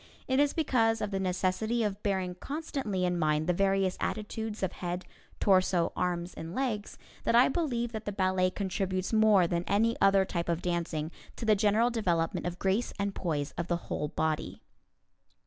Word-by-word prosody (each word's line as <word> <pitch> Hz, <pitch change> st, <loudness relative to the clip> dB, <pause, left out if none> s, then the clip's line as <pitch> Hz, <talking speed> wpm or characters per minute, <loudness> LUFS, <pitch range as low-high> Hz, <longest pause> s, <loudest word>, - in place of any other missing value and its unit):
It 260 Hz, +1 st, +2 dB
is 290 Hz, 0 st, +4 dB
because 225 Hz, -8 st, +2 dB
of 210 Hz, -1 st, -3 dB
the 195 Hz, -, -1 dB
necessity 190 Hz, +5 st, 0 dB
of 205 Hz, -1 st, -2 dB
bearing 190 Hz, -3 st, -1 dB
constantly 265 Hz, -, -3 dB
in 175 Hz, -1 st, 0 dB
mind 155 Hz, -1 st, +1 dB
the 180 Hz, -, +2 dB
various 195 Hz, 0 st, +1 dB
attitudes 215 Hz, 0 st, -3 dB
of 190 Hz, -, 0 dB
head, 175 Hz, 0 st, -4 dB, 0.3 s
torso, 185 Hz, -3 st, +3 dB
arms 175 Hz, 0 st, -1 dB
and 165 Hz, +2 st, -7 dB
legs 235 Hz, -6 st, -2 dB, 0.3 s
that -, -, +2 dB
I 245 Hz, +2 st, +6 dB
believe 245 Hz, -7 st, -1 dB
that 220 Hz, -2 st, -6 dB
the 205 Hz, -, -2 dB
ballet 185 Hz, -1 st, +2 dB
contributes 190 Hz, 0 st, -2 dB
more 215 Hz, -4 st, +5 dB
than 170 Hz, 0 st, -1 dB
any 225 Hz, +3 st, +2 dB
other 195 Hz, -1 st, +5 dB
type 170 Hz, -2 st, -3 dB
of 170 Hz, 0 st, -1 dB
dancing 170 Hz, -3 st, -2 dB, 0.2 s
to 230 Hz, -, -5 dB
the 215 Hz, -1 st, +5 dB
general 215 Hz, +4 st, +3 dB
development 175 Hz, -8 st, 0 dB
of 175 Hz, 0 st, -4 dB
grace 195 Hz, +6 st, 0 dB
and 200 Hz, -1 st, -1 dB
poise 150 Hz, -6 st, -2 dB
of 170 Hz, -, -2 dB
the 175 Hz, -, +1 dB
whole 150 Hz, -, -1 dB
body. 155 Hz, +1 st, -2 dB
195 Hz, 180 wpm, -30 LUFS, 175-220 Hz, 0.3 s, I